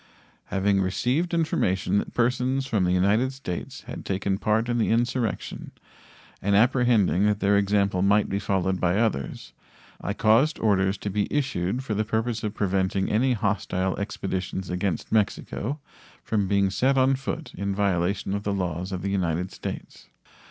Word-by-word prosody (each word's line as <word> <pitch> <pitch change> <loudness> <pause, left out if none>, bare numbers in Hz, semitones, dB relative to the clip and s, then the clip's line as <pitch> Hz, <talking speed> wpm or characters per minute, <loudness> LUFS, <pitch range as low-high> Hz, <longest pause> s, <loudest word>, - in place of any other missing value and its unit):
Having 100 0 +1
received 125 - 0
information 105 - +1
that - - -6
persons 125 +2 +1
from 105 -8 +1
the 90 - +1
United 100 +8 +2
States 90 -10 -6
had - - -8
taken 95 0 -1
part 110 +2 +1
in 120 -1 0
the 110 - +1
insurrection, 120 0 -1 0.7
and 100 +1 +2
apprehending 115 -4 +3
that 105 -1 +1
their 100 0 +3
example 100 -2 +2
might 100 +2 +3
be 100 - -1
followed 95 -2 0
by 90 +1 +2
others, 105 - -2 0.5
I 100 - -2
caused 115 +8 +3
orders 95 -2 +2
to 100 - -4
be 100 +1 -1
issued 125 -5 -1
for 115 - -3
the 105 +1 +1
purpose 110 +1 -2
of 105 0 -3
preventing 95 0 0
any 125 +4 +3
hostile 95 -3 -1
expeditions 95 -2 -3
against 90 -2 -2
Mexico 110 +5 -1 0.4
from 105 -3 0
being 100 -1 +2
set 130 +8 +2
on 130 +1 +4
foot 135 +4 -4
in 100 0 -2
violation 95 0 0
of 100 - -1
the 100 0 -2
laws 90 -1 -3
of 95 -1 -4
the 100 - -1
United 90 -1 -1
States. - - -7
100 Hz, 160 wpm, -25 LUFS, 95-115 Hz, 0.7 s, on